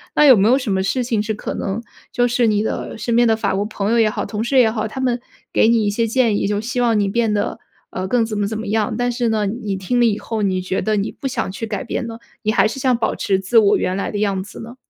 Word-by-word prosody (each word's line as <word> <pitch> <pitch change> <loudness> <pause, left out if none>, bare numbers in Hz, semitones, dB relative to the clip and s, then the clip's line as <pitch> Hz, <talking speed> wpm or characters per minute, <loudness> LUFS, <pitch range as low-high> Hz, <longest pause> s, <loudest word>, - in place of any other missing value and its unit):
那 300 - +5
有 265 -3 +9
没 200 0 +3
有 250 +3 +5
什 255 -6 -3
么 190 0 +1
事 195 +7 0
情 230 -3 0
是 215 +1 -2
可 - - -5
能 195 +4 -3 0.3
就 245 0 +2
是 240 -1 +2
你 210 -1 +2
的 220 - -4
身 230 +1 -1
边 240 0 +5
的 225 - +3
法 210 -3 -1
国 200 - 0
朋 210 -1 -2
友 235 - +3
也 220 -1 +4
好、 - - -3
同 215 0 -3
事 265 +3 +1
也 235 -4 +5
好， 220 -1 -2
他 240 - -7
们 250 -2 0 0.3
给 - - +4
你 230 -2 +3
一 - - +2
些 230 +2 0
建 225 -3 +2
议， - - 0
就 205 0 0
希 245 +3 -2
望 230 -3 +2
你 200 - +1
变 225 +2 +1
得， 205 -1 -1 0.3
呃， 185 0 -4
更 235 +3 +2
怎 215 -2 -4
么 205 - 0
怎 220 +1 -4
么 220 - -5
样， 215 +1 0
但 245 0 0
是 240 -1 -1
呢， 215 -2 +1
你 210 -1 -3
听 190 +6 -1
了 240 - +5
以 210 -2 +1
后， 225 -1 -4
你 190 -2 +1
觉 185 +1 -2
得 215 0 0
你 200 - -1
不 275 - -5
想 240 -7 -2
去 225 +4 -5
改 205 -3 -3
变 235 +1 -3
了， 225 0 -8 0.2
你 215 -2 0
还 205 -1 +3
是 250 +5 -5
想 255 -2 +2
保 225 - -1
持 195 - 0
自 210 +5 +4
我 210 -1 +4
原 185 - -1
来 195 - -2
的 210 - -4
样 200 -2 0
子 195 - -10
呢？ 230 +2 -9
220 Hz, 325 characters per minute, -20 LUFS, 205-235 Hz, 0.3 s, 有